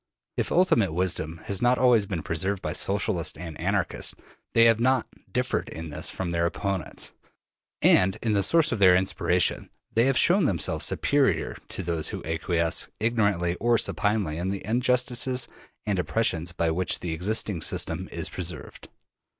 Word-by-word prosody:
If - - -2
ultimate 115 - +3
wisdom 85 -2 -2
has 100 -2 -2
not 120 +1 +3
always 120 -5 +4
been 90 -5 -3
preserved 95 +4 -2
by - - -2
Socialists 95 -5 0
and 80 -1 -7
Anarchists, - - -1 0.4
they 115 0 +6
have 115 -1 +5
not 130 +2 +2 0.3
differed - - -1
in 80 0 -7
this 75 - -3
from 90 -2 -4
their 85 0 +1
opponents; 95 -1 -3 0.7
and 95 +1 +4
in 110 -2 +1
the 100 - +3
source 160 - +3
of 115 - -1
their 95 -2 +7
inspiration 90 -1 +1 0.2
they 115 +2 +3
have 135 0 +2
shown 180 0 +4
themselves 90 - 0
superior 135 - +1
to - - -5
those 85 -2 -2
who - - -6
acquiesce 80 +1 -1
ignorantly 100 -6 +1
or 120 0 +3
supinely 105 -8 0
in 90 - -2
the 100 0 -4
injustices 125 +2 +1 0.4
and 100 -3 0
oppressions 85 -1 0
by 85 -1 0
which 90 +3 0
the 85 -2 -3
existing 95 +1 -1
system - - -2
is - - -2
preserved. - - -6
95 Hz, 160 wpm, -26 LUFS, 85-115 Hz, 0.7 s, their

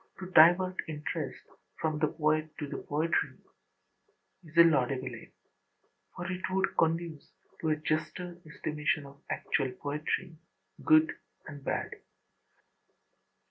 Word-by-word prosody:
To 185 -1 -8
divert 180 +3 +6
interest 150 -2 -4 0.4
from 155 -1 -1
the 155 - +3
poet 155 0 0
to 150 - -3
the - - -5
poetry 160 +3 0 1.1
is 160 0 -13
a 170 - +11
laudable 130 -5 +2
aim: 115 - -11 0.8
for 175 - -5
it 185 0 -4
would 190 +1 0
conduce 165 -1 0 0.3
to 160 - -1
a 155 - +3
juster 170 +3 -3
estimation 150 -1 -2
of 140 0 -14
actual 130 - 0
poetry, 150 +5 -3 0.5
good 315 +2 +6 0.3
and 145 -2 -9
bad. - - -2
155 Hz, 120 wpm, -30 LUFS, 150-170 Hz, 1.1 s, a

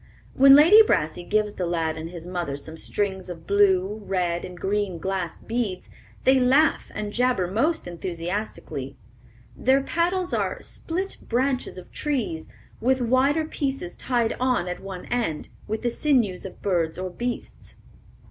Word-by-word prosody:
When 275 +1 +8
Lady 340 +10 +9
Brassey 165 - +1
gives 210 +2 0
the 180 - -2
lad 165 -2 -1
and 160 +1 -6
his 170 -1 -8
mother 175 -6 -3
some 160 +3 -8
strings 190 +2 -2
of 165 -2 -8
blue, 200 +1 +3
red, 180 -3 -1
and 180 -1 -8
green 195 -1 -1
glass 185 0 -3
beads, 225 -6 -3 0.3
they 265 0 +5
laugh 275 +5 +3
and 205 -1 -4
jabber 245 -6 +2
most 250 - 0
enthusiastically. 170 -5 -4 0.6
Their 265 +2 +3
paddles 355 +4 0
are - - -1
"split 375 +4 -4
branches 255 -2 0
of 180 - -11
trees, 245 - -2 0.3
with 260 +3 +2
wider 260 +6 +2
pieces 275 - -3
tied 240 -3 0
on 250 -8 +1
at 180 - -4
one 190 -2 -7
end, 225 -11 -2 0.2
with 220 +2 -3
the 240 - +1
sinews 230 -11 +1
of 185 - -14
birds 170 -5 0
or 185 0 -4
beasts." 240 +6 -5
205 Hz, 150 wpm, -25 LUFS, 175-255 Hz, 0.6 s, Lady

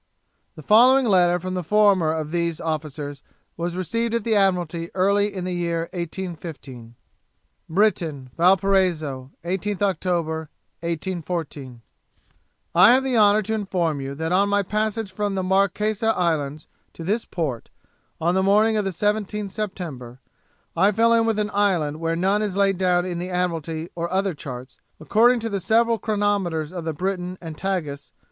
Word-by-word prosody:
The 155 - -11
following 250 - +6
letter 180 -4 +3
from 185 +1 -5
the 180 -1 -2
former 195 -3 +3
of 155 -1 -3
these 170 -1 -1
officers 150 -3 -4 0.3
was 170 +1 -3
received 230 +6 -1
at 230 - -1
the 225 - 0
Admiralty 175 -4 +1
early 200 +2 +2
in 185 -2 -5
the 180 0 -3
year 170 -1 -1
1815. 165 -9 -7 0.7
Briton, 160 -8 0
Valparaiso, 175 -7 +2 0.2
18th 195 +3 -2
Oct., 200 -2 -1
1814. 160 -4 -4 0.9
'I 185 +6 +8
have 260 +2 +4
the 265 -2 -1
honour 210 -1 +5
to 220 +3 -3
inform 180 -8 -1
you 135 +1 -5
that 160 +3 -3
on 200 +2 +3
my 205 0 +2
passage 215 0 -2
from 205 0 -2
the 190 - -1
Marquesas 200 +4 +1
islands 155 -4 -1 0.3
to 165 - -9
this 210 +7 -1
port, 145 -9 -4 0.5
on 170 +2 +1
the 190 - +2
morning 210 +3 +3
of 210 - 0
the - - 0
17th 210 +1 -1
September, 160 - -6 0.6
I 195 +5 +4
fell 230 +2 +3
in 230 0 +3
with 225 -2 +1
an 210 0 -1
island 175 -7 +1
where 165 0 -1
none 195 +4 +1
is 200 -3 -2
laid 195 -2 +2
down 180 -1 +2
in 175 -2 -3
the 180 +1 -4
Admiralty 165 -2 -2
or 170 0 -4
other 190 0 0
charts, 130 -3 -9 0.2
according 230 +9 +3
to 225 - -2
the 200 -2 -2
several 225 +4 +2
chronometers 200 -7 -1
of 175 -3 -5
the 160 - -2
Briton 185 +2 -3
and 165 -3 -8
Tagus. 155 -6 -4
185 Hz, 160 wpm, -23 LUFS, 160-205 Hz, 0.9 s, I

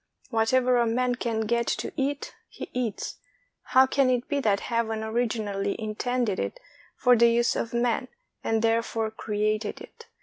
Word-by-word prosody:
Whatever 245 +2 +3
a 235 -1 +3
man 250 +2 +1
can 235 -2 -2
get 235 +2 0
to - - -2
eat, 280 +1 -2 0.2
he - - -9
eats; 245 -4 -3 0.4
how 260 +1 +5
can 265 0 +2
it 250 -1 0
be 285 - 0
that 205 -6 +1
Heaven 225 -2 -1
originally 215 -3 -1
in 215 -1 -4
tended 245 -3 -1
it - - -3 0.4
for 250 -1 +5
the 235 0 +6
use 235 0 +2
of 230 - -2
man, 240 +1 0 0.4
and 225 0 0
therefore 225 -1 +1
created 215 0 -2
it? 460 - -13
230 Hz, 165 wpm, -26 LUFS, 220-250 Hz, 0.4 s, the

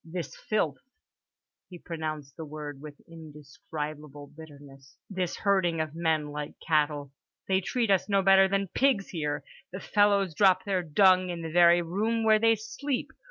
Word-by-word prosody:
This 170 +1 -6
filth"—he 210 - -7
pronounced 155 -5 -6
the 165 - -7
word 150 -2 -8
with 150 -1 -11
indescribable 150 -2 -9
bitterness—"this 145 +4 -8
herding 190 -5 +1
of 155 -1 -3
men 160 -3 -1
like 150 0 -6
cattle—they 150 +4 -1
treat 230 +2 -1
us 190 +1 +1
no 195 -1 +2
better 195 0 +6
than 195 -1 -1
pigs 255 -5 +1
here. 150 -4 -3 0.3
The 185 - -6
fellows 200 -3 +2
drop 185 +1 +3
their 190 -2 -1
dung 185 +2 +3
in 170 -1 -5
the 160 - -5
very 175 +1 +5
room 215 +7 -1
where 220 -1 +4
they 225 +1 +4
sleep. 235 +5 -4
170 Hz, 145 wpm, -27 LUFS, 150-195 Hz, 0.3 s, better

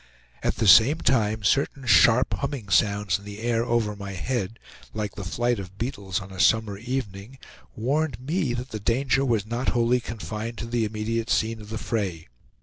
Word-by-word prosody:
At - - 0
the - - -1
same 115 - +7
time 110 -4 +1
certain 135 +4 +1
sharp, 115 +5 +5
humming 140 -7 -4
sounds 100 -2 +2
in - - -16
the 100 0 -8
air 115 0 0
over 115 -3 0
my 100 -1 -7
head, 115 +2 -3 0.4
like 105 -2 -3
the 100 - -7
flight 120 +5 0
of 95 0 -9
beetles 100 -6 -3
on 95 -1 -10
a 95 - -9
summer 110 -1 +3
evening, 115 -1 -5 0.4
warned 140 +3 -1
me 145 -1 -1
that 125 +2 -5
the 110 - -4
danger 130 +5 +1
was 115 -6 +1
not 120 +3 -2
wholly 120 +1 +3
confined 115 0 -6
to 115 - -4
the 115 -1 0
immediate 110 +2 -3
scene 110 0 0
of 105 - -11
the 110 - -4
fray. 95 - -3
115 Hz, 185 wpm, -25 LUFS, 105-120 Hz, 0.4 s, same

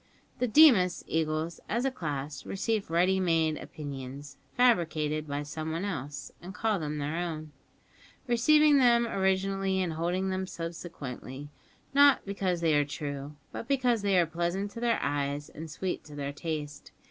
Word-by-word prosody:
The 250 - +1
Deemas 215 - +6
eagles 160 +1 -1
as 235 +4 0
a 270 - +1
class 145 - -4
receive 210 0 -2
ready 180 +3 +3
made 165 -4 +1
opinions, 140 -1 -8 0.2
fabricated 155 -10 +2
by 145 0 -3
someone 160 +4 -4
else, 145 -7 -5
and 180 +2 -9
call 215 +1 0
them 150 -1 -3
their 150 +3 -2
own 155 -3 -4 0.7
receiving 290 +5 +5
them 235 -2 +5
originally 195 -1 0
and 180 -3 -1
holding 180 +4 -1
them 190 0 -2
subsequently, 145 -5 -7 0.4
not 285 0 +6
because 190 -3 -1
they 165 -2 +3
are 145 0 +4
true, 145 0 -5 0.2
but 230 - -6
because 250 -5 +2
they 200 -2 +2
are 175 - +5
pleasant 175 +5 -2
to 230 - -8
their 235 -1 +2
eyes 145 +1 -2
and 160 +1 -8
sweet 180 +5 -3
to 150 - -11
their 140 0 -4
taste. 150 -2 -5
170 Hz, 155 wpm, -29 LUFS, 150-200 Hz, 0.7 s, Deemas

